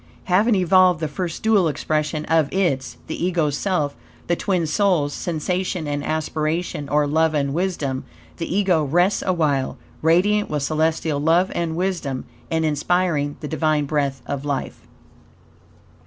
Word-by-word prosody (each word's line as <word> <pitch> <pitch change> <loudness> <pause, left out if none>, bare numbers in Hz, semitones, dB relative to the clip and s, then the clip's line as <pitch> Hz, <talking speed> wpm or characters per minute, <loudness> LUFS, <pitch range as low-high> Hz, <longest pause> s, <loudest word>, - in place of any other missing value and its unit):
Having 205 +5 +3
evolved 185 -2 +4
the 160 - -1
first 170 +3 -4
dual 215 -5 +4
expression 155 0 -1
of 160 -3 +2
its 170 -9 0
(the - - -4
Ego's) 165 -5 +1
self, 155 -6 -1 0.3
the 175 - +1
twin 180 -2 0
souls 160 -4 +1
Sensation 180 0 -2
and 145 0 -2
Aspiration, 155 0 -2
or 150 0 +3
Love 160 +2 +2
and 140 -2 0
Wisdom, 155 -7 -1 0.3
the - - -4
Ego 185 -4 +2
rests 175 +7 +2
awhile, 150 -7 0 0.2
radiant 190 +6 +3
with 150 -2 -1
celestial 155 0 0
love 165 +5 +3
and 165 -2 -2
wisdom, 170 -8 -2 0.2
and 160 -1 0
inspiring 155 -1 0
the 150 - -4
Divine 155 -1 +1
breath 140 -2 -1
of 140 -1 -4
life. 145 -2 -4
160 Hz, 140 wpm, -22 LUFS, 145-180 Hz, 0.3 s, evolved